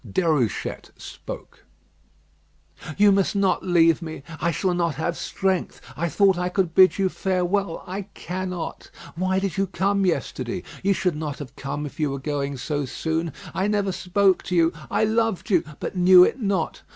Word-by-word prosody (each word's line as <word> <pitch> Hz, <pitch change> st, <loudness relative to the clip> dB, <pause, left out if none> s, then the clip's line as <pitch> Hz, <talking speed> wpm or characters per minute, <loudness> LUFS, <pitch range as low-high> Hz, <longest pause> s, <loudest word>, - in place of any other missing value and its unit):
Déruchette 155 Hz, -, -1 dB
spoke. -, -, -9 dB, 1.3 s
"You 205 Hz, 0 st, +6 dB
must 195 Hz, +1 st, +2 dB
not 195 Hz, -1 st, +2 dB
leave 170 Hz, -2 st, +3 dB
me. 160 Hz, -4 st, -7 dB, 0.2 s
I 170 Hz, -, +1 dB
shall 180 Hz, +3 st, 0 dB
not 170 Hz, -4 st, 0 dB
have 170 Hz, +3 st, -2 dB
strength. 190 Hz, 0 st, -2 dB, 0.2 s
I 170 Hz, +2 st, -1 dB
thought 190 Hz, +2 st, +3 dB
I 180 Hz, 0 st, 0 dB
could 180 Hz, -3 st, 0 dB
bid 185 Hz, +1 st, +6 dB
you 195 Hz, -1 st, +2 dB
farewell. 185 Hz, -1 st, -1 dB
I 190 Hz, +1 st, -5 dB
cannot. 180 Hz, -1 st, -5 dB, 0.3 s
Why 185 Hz, +2 st, 0 dB
did 190 Hz, -3 st, -2 dB
you 195 Hz, 0 st, +1 dB
come 195 Hz, +2 st, 0 dB
yesterday? 140 Hz, -9 st, -2 dB, 0.2 s
You 200 Hz, +1 st, +2 dB
should 180 Hz, -3 st, 0 dB
not 150 Hz, -2 st, -4 dB
have 140 Hz, -2 st, -9 dB
come 145 Hz, +2 st, -4 dB
if 145 Hz, -, -9 dB
you 150 Hz, -2 st, +1 dB
were 135 Hz, -, -3 dB
going 140 Hz, 0 st, -3 dB
so 145 Hz, +3 st, -2 dB
soon. 160 Hz, +5 st, -2 dB, 0.2 s
I 190 Hz, -, 0 dB
never 205 Hz, -2 st, 0 dB
spoke 185 Hz, +1 st, +2 dB
to 180 Hz, -, -2 dB
you. 165 Hz, -1 st, +3 dB, 0.2 s
I -, -, +1 dB
loved 220 Hz, -4 st, 0 dB
you; 180 Hz, -4 st, +4 dB, 0.2 s
but -, -, -5 dB
knew 180 Hz, 0 st, +8 dB
it 270 Hz, -, +1 dB
not. 195 Hz, -6 st, -1 dB
180 Hz, 175 wpm, -24 LUFS, 160-195 Hz, 1.3 s, knew